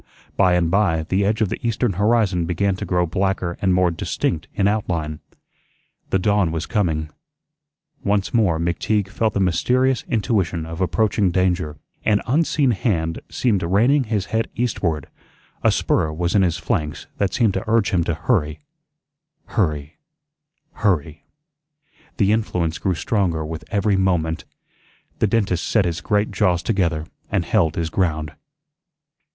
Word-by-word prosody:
By 90 Hz, -2 st, +4 dB
and 85 Hz, -2 st, +1 dB
by 95 Hz, -5 st, +2 dB
the 95 Hz, +2 st, +2 dB
edge 105 Hz, +3 st, 0 dB
of 105 Hz, -, +2 dB
the -, -, -4 dB
eastern 115 Hz, -1 st, 0 dB
horizon 100 Hz, -3 st, +2 dB
began 95 Hz, +3 st, 0 dB
to -, -, -4 dB
grow 90 Hz, -1 st, +2 dB
blacker 95 Hz, 0 st, -1 dB
and 95 Hz, -, +2 dB
more 90 Hz, -1 st, +3 dB
distinct 80 Hz, -1 st, -2 dB
in 100 Hz, -, +2 dB
out 105 Hz, -1 st, 0 dB
line. 80 Hz, -3 st, -2 dB, 0.9 s
The -, -, +2 dB
dawn 100 Hz, -2 st, +2 dB
was 80 Hz, 0 st, -3 dB
coming. 80 Hz, -8 st, -1 dB, 0.9 s
Once 100 Hz, -1 st, 0 dB
more 100 Hz, -9 st, +2 dB
McTeague 95 Hz, +4 st, 0 dB
felt 110 Hz, +2 st, -1 dB
the -, -, +1 dB
mysterious 125 Hz, +9 st, +2 dB
intuition 100 Hz, -8 st, 0 dB
of 80 Hz, +2 st, -6 dB
approaching 95 Hz, +3 st, +2 dB
danger; 90 Hz, -4 st, 0 dB, 0.3 s
an 105 Hz, -2 st, +2 dB
unseen 145 Hz, 0 st, +2 dB
hand 85 Hz, -7 st, -1 dB
seemed 110 Hz, -7 st, +1 dB
reining 120 Hz, +11 st, +3 dB
his 105 Hz, -3 st, -1 dB
head 115 Hz, 0 st, 0 dB
eastward; 90 Hz, -, -1 dB, 0.6 s
a -, -, +4 dB
spur 80 Hz, -, +1 dB
was 85 Hz, +2 st, -1 dB
in 100 Hz, -, +4 dB
his 85 Hz, -3 st, +1 dB
flanks 75 Hz, -1 st, -2 dB
that 100 Hz, -2 st, +1 dB
seemed 115 Hz, -5 st, +2 dB
to -, -, -2 dB
urge 115 Hz, -2 st, +2 dB
him 90 Hz, -3 st, +2 dB
to 85 Hz, -, -1 dB
hurry, 80 Hz, -8 st, 0 dB, 0.9 s
hurry, 75 Hz, -6 st, -1 dB, 0.8 s
hurry. 80 Hz, -7 st, -1 dB, 0.9 s
The 100 Hz, -1 st, +3 dB
influence 90 Hz, -7 st, 0 dB
grew 95 Hz, -2 st, 0 dB
stronger 85 Hz, -4 st, 0 dB
with 80 Hz, 0 st, -6 dB
every 100 Hz, -1 st, +1 dB
moment. 85 Hz, -4 st, 0 dB, 0.7 s
The 110 Hz, -, +3 dB
dentist 100 Hz, -5 st, 0 dB
set 110 Hz, -4 st, +2 dB
his 85 Hz, 0 st, -2 dB
great 105 Hz, +2 st, 0 dB
jaws 90 Hz, -4 st, +1 dB
together 85 Hz, -8 st, 0 dB, 0.2 s
and -, -, 0 dB
held 80 Hz, -2 st, +2 dB
his 85 Hz, -1 st, -2 dB
ground. 80 Hz, -5 st, 0 dB
95 Hz, 150 wpm, -21 LUFS, 85-105 Hz, 0.9 s, By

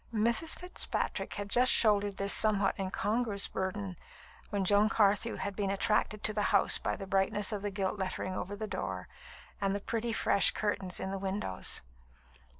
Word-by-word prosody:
Mrs. 235 Hz, +8 st, +1 dB
Fitzpatrick 360 Hz, +1 st, -2 dB
had 205 Hz, -, -5 dB
just 245 Hz, +5 st, +4 dB
shouldered 205 Hz, -3 st, +4 dB
this 200 Hz, 0 st, +2 dB
somewhat 210 Hz, -2 st, +2 dB
incongruous 205 Hz, +2 st, 0 dB
burden, 190 Hz, -1 st, -4 dB, 0.5 s
when 200 Hz, -2 st, -2 dB
Joan 205 Hz, +2 st, +3 dB
Carthew 210 Hz, +1 st, +2 dB
had 200 Hz, -, -5 dB
been 200 Hz, -1 st, -2 dB
attracted 210 Hz, +1 st, 0 dB
to 215 Hz, -, 0 dB
the 210 Hz, -, -1 dB
house 200 Hz, -, +4 dB
by -, -, -2 dB
the 195 Hz, -, -8 dB
brightness 195 Hz, +2 st, +1 dB
of 210 Hz, -2 st, -3 dB
the 205 Hz, -, -3 dB
gilt 195 Hz, 0 st, -3 dB
lettering 185 Hz, 0 st, -4 dB
over 195 Hz, +3 st, -5 dB
the 215 Hz, +2 st, -5 dB
door, 95 Hz, -, -5 dB, 0.5 s
and 195 Hz, 0 st, 0 dB
the -, -, -2 dB
pretty, 230 Hz, +3 st, -3 dB
fresh 200 Hz, -, +3 dB
curtains 195 Hz, -3 st, -3 dB
in 190 Hz, -, -4 dB
the 195 Hz, -, -4 dB
windows. 190 Hz, -, +1 dB
200 Hz, 170 wpm, -30 LUFS, 195-215 Hz, 0.5 s, just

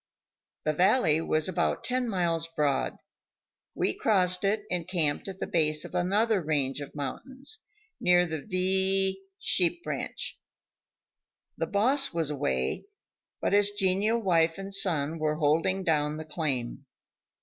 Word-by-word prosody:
The 155 Hz, -, 0 dB
valley 175 Hz, -, +3 dB
was 155 Hz, -1 st, +1 dB
about 180 Hz, -2 st, -1 dB
ten 255 Hz, -1 st, -1 dB
miles 170 Hz, -4 st, 0 dB
broad; 145 Hz, -2 st, 0 dB, 0.8 s
we -, -, 0 dB
crossed 185 Hz, -4 st, +2 dB
it 205 Hz, +2 st, 0 dB
and 175 Hz, -2 st, -1 dB
camped 165 Hz, -5 st, +1 dB
at 190 Hz, -1 st, -7 dB
the -, -, -4 dB
base 155 Hz, -2 st, +1 dB
of -, -, -10 dB
another 200 Hz, +4 st, +1 dB
range 145 Hz, -3 st, -1 dB
of 145 Hz, -, -9 dB
mountains, 265 Hz, -, -5 dB, 0.4 s
near 180 Hz, 0 st, +4 dB
the 160 Hz, -3 st, -4 dB
V 190 Hz, +1 st, +3 dB, 0.2 s
sheep 195 Hz, -, +1 dB
ranch. -, -, -4 dB, 1.2 s
The -, -, -3 dB
boss 260 Hz, +7 st, +2 dB
was 160 Hz, -3 st, -1 dB
away, 65 Hz, -, -2 dB, 0.6 s
but -, -, 0 dB
his 205 Hz, 0 st, +5 dB
genial 205 Hz, +4 st, +1 dB
wife 165 Hz, -5 st, +2 dB
and 195 Hz, 0 st, -6 dB
son 165 Hz, -5 st, 0 dB
were 155 Hz, 0 st, 0 dB
holding 165 Hz, +5 st, +1 dB
down 150 Hz, -2 st, 0 dB
the 160 Hz, -, -7 dB
claim. 145 Hz, -7 st, -3 dB
180 Hz, 140 wpm, -28 LUFS, 155-195 Hz, 1.2 s, his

